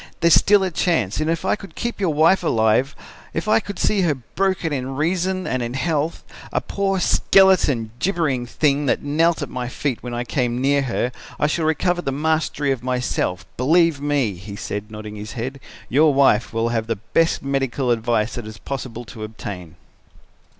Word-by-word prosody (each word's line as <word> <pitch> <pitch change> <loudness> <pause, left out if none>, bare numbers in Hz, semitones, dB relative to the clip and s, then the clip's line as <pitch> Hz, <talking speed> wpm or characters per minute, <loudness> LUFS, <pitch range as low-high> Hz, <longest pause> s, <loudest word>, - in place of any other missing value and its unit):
There 170 - +4
is - - +6
still 205 -1 +5
a 185 - -1
chance 155 - 0
and 155 +1 0
if 165 +2 -1
I - - +2
could 200 -2 -12
keep 235 -2 -3
your 185 -4 +2
wife 160 +5 +4
alive, 115 -2 +2 0.4
if 165 +5 -2
I 215 - +5
could 200 -3 -7
see 205 -2 +2
her 165 -5 +2
broken 170 +6 -2
in 135 -1 -3
reason 185 +5 0
and 130 - -1
in 120 +1 -3
health, 155 +2 -1 0.3
a - - +1
poor, 195 -1 -1
skeleton, 175 - +3
gibbering 150 -10 0
thing 145 +2 +1
that - - +1
knelt 160 +4 +2
at - - -4
my 125 -1 -3
feet 125 0 -3
when 120 -1 -5
I 120 - -2
came 125 -1 -1
near 140 +2 +2
her 125 -1 -1 0.3
I - - +2
should 155 +2 0
recover 175 +3 +1
the 135 - -2
mastery 150 -1 0
of 130 - -2
myself. 125 -7 -1
Believe 160 +3 +3
me,' 145 -7 +1
he 100 +3 -9
said, 105 +1 -5
nodding 105 -1 -8
his 105 0 -7
head, 130 +3 -5 0.3
'your 150 +4 +4
wife 135 -5 +3
will 115 +1 0
have 115 -1 -1
the 115 - 0
best 125 +12 0
medical 135 -2 0
advice 115 -1 0
that 120 - -5
it - - -7
is 110 - -10
possible 120 -1 -6
to 110 0 -9
obtain.' 95 -6 -7
140 Hz, 195 wpm, -21 LUFS, 120-165 Hz, 0.4 s, is